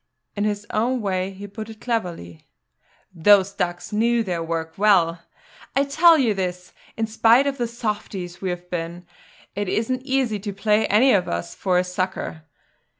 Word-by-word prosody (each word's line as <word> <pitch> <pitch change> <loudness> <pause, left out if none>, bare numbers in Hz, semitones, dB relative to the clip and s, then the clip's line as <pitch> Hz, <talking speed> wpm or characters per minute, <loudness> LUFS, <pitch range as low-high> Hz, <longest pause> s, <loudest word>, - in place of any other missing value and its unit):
In 205 0 -1
his 205 -1 -2
own 245 +4 +1
way 190 -3 -1
he 195 +1 -9
put 215 +2 -8
it 220 -1 -11
cleverly: 175 - -4 0.7
"Those 195 +3 +4
ducks 175 +2 -3
knew 230 +2 +2
their 180 -5 -3
work 165 0 -3
well. 180 -5 +3 0.5
I 275 - +4
tell 320 +4 +5
you 245 -7 +2
this, 180 -2 -4 0.2
in 225 - 0
spite 225 +4 +4
of 280 -1 -2
the 240 - 0
softies 210 -6 -5
we 190 - -2
have 180 0 -5
been, 170 0 -4 0.5
it 205 -1 -2
isn't 255 +5 -1
easy 260 -5 0
to 200 0 -5
play 210 +2 +2
any 245 +6 +5
of 190 - +2
us 85 0 -3
for 180 - 0
a 180 - +3
sucker. 180 -3 -4
205 Hz, 170 wpm, -23 LUFS, 180-225 Hz, 0.7 s, tell